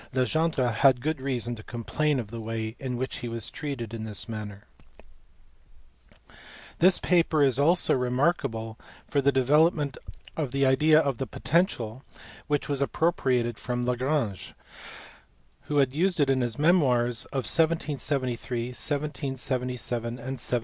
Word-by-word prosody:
Legendre 130 0 +1
had 125 +2 +4
good 155 +2 -2
reason 120 -3 -2
to 110 - -8
complain 120 +6 -1
of 110 -3 -6
the 115 - -6
way 110 0 -4
in 125 -2 -4
which 130 +2 -3
he 120 - -5
was 115 -1 -3
treated 130 -7 -5
in 115 -1 -5
this 110 +1 -4
matter. 105 -3 -7 2.2
This 185 +2 +6
paper 165 -4 +2
is 135 -2 +3
also 170 +5 +4
remarkable 125 -4 -1 0.3
for 140 - +1
the 140 +1 +3
development 145 +2 +2 0.4
of 150 -6 -2
the 140 +1 +1
idea 150 +4 +5
of 140 -6 -1
the 135 - -2
potential, 130 - -1 0.4
which 145 -1 0
was 140 -2 -1
appropriated 130 -7 0
from 125 0 -3
Lagrange* 125 -4 -1 1.1
who 150 - -2
had 135 -2 +3
used 175 +3 +1
it 140 -2 +3
in 130 -1 +1
his 120 -2 -2
memoirs 125 -8 +3
of 135 -3 -4
1773, 135 -7 0
1777, 130 -4 -2
and 120 - -6
1780. 125 -1 -2
130 Hz, 140 wpm, -27 LUFS, 120-150 Hz, 2.2 s, This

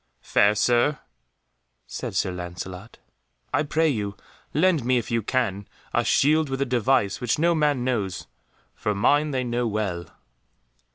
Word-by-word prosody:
"Fair 100 +1 +3
Sir," 120 +7 +2 0.9
said - - -6
Sir 95 - +1
Lancelot, 90 +4 -7 0.6
"I - - +3
pray 155 +2 +1
you 105 -8 -2 0.3
lend 165 -2 +2
me, 125 +1 +2
if 120 +1 -3
you 115 0 +1
can, 105 -4 -1 0.3
a - - +2
shield 155 +1 +3
with 135 0 -3
a 140 - +1
device 125 -4 +1
which 120 -2 0
no 170 +3 +3
man 150 -5 +1
knows, 105 -8 -2 0.5
for 105 - -2
mine 145 +9 +3
they 130 -3 -1
know 120 0 -1
well." 100 -5 -2
120 Hz, 150 wpm, -24 LUFS, 100-145 Hz, 0.9 s, Fair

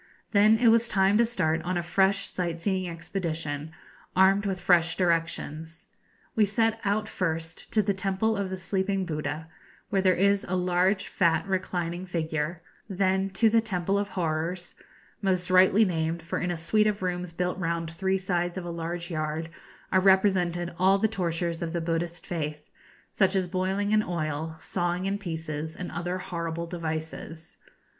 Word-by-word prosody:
Then 215 +1 +6
it 235 0 +5
was 230 +1 +4
time 195 +1 +3
to 235 - +5
start 165 -8 0
on 180 +2 -2
a 175 - -1
fresh 195 +3 +1
sight 170 -2 -2
seeing 185 0 -1
expedition, 165 -3 -4 0.4
armed 195 +2 +4
with 190 -2 -2
fresh 170 -2 +3
directions. 165 -2 -1 0.5
We 220 - +4
set 225 +2 +1
out 210 +1 0
first 165 -4 -3
to 215 - +4
the 200 0 +1
Temple 195 +3 0
of 200 -2 -2
the 190 - -4
Sleeping 190 +1 -1
Buddha, 155 -1 -4 0.4
where 195 - +2
there 185 -1 +4
is 200 +2 +3
a 185 - 0
large, 180 +2 +1
fat, 165 -1 +2
reclining 185 -2 -2
figure; 160 0 -2 0.3
then 190 0 +1
to 195 +4 +3
the 225 +1 +4
Temple 195 -2 0
of 205 - -1
Horrors 175 0 -2 0.5
most 185 -2 0
rightly 190 +4 +6
named, 165 -2 -1
for 165 - -3
in 180 - -1
a 175 - -1
suite 210 +6 +2
of 205 -2 -1
rooms 180 -1 -2
built 180 +2 -2
round 165 -1 -2
three 190 +3 0
sides 175 -1 -1
of 180 - -4
a 175 - -4
large 170 +1 -4
yard 155 +1 -2 0.4
are 190 - +5
represented 185 -3 +3
all 190 +2 +5
the 220 +2 +2
tortures 170 -5 -2
of 170 -1 -3
the 170 - 0
Buddhist 165 +1 -2
faith, 150 -3 -4 0.4
such 190 -1 +2
as 185 -2 +1
boiling 190 +3 -1
in 215 0 +5
oil, 160 -3 -3
sawing 175 +1 -2
in 200 +1 -1
pieces, 160 -4 -4
and 180 - -6
other 175 +1 -3
horrible 170 -2 -4
devices. 160 -1 -5
180 Hz, 170 wpm, -27 LUFS, 165-195 Hz, 0.5 s, Then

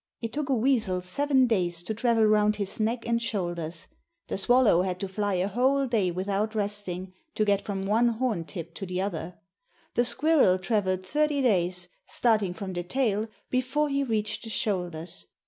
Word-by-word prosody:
It 230 -1 -5
took 295 -1 -2
a 270 - +3
weasel 225 -6 +2
seven 265 +8 +2
days 175 -7 0
to 200 - -3
travel 230 0 +2
round 210 0 +3
his 200 0 -3
neck 230 +2 -1
and 235 0 +1
shoulders; 175 -6 -3 0.4
the - - -2
swallow 240 -5 +4
had 185 -1 -2
to 195 - -2
fly 205 +1 -1
a 180 +1 +1
whole 260 +6 +2
day 220 -7 +1
without 200 +4 -2
resting, 200 -3 -2 0.2
to 215 - +2
get 200 -1 +2
from 195 -2 -4
one 225 +4 +3
horn 230 -7 -1
tip 170 -2 -7
to 195 - -5
the 180 0 -3
other; 180 -2 -3 0.6
the 240 - +3
squirrel 245 - +3
travelled 185 -2 -1
thirty 295 +6 +1
days, 180 -5 +1 0.2
starting 215 -6 +1
from 195 -2 -5
the 175 - -2
tail, 215 +2 0 0.2
before 260 +4 +1
he 280 0 +1
reached 215 -4 -2
the 225 - -7
shoulders. 175 - -3
210 Hz, 180 wpm, -27 LUFS, 185-235 Hz, 0.6 s, swallow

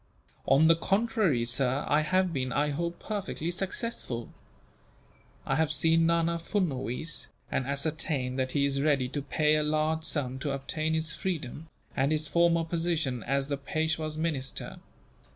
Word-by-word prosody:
"On 155 +4 +6
the 165 - +6
contrary, 195 - +1
sir, 125 +3 0
I 150 - +3
have 185 +3 +1
been, 130 -3 -1
I 145 +4 +1
hope, 170 +3 -2
perfectly 195 -5 -3
successful. 180 - -3 1.1
I - - +1
have 160 -1 +2
seen 165 +2 +4
Nana 170 0 +2
Furnuwees, 160 - -2 0.2
and 130 - -1
ascertained 140 -2 -1
that 130 0 -1
he 140 -1 +2
is 140 -1 0
ready 140 -4 +2
to 145 +2 -3
pay 150 +2 +2
a - - +2
large 155 +1 0
sum 130 -5 0
to 140 0 -2
obtain 155 +3 -2
his 160 0 +1
freedom, 160 -4 -4 0.3
and 135 +3 +2
his 155 0 +2
former 170 0 +3
position 165 -6 -1
as 135 +4 0
the 140 -1 -2
Peishwa's 155 +2 -2
minister. 155 -5 -2
155 Hz, 150 wpm, -29 LUFS, 135-165 Hz, 1.1 s, On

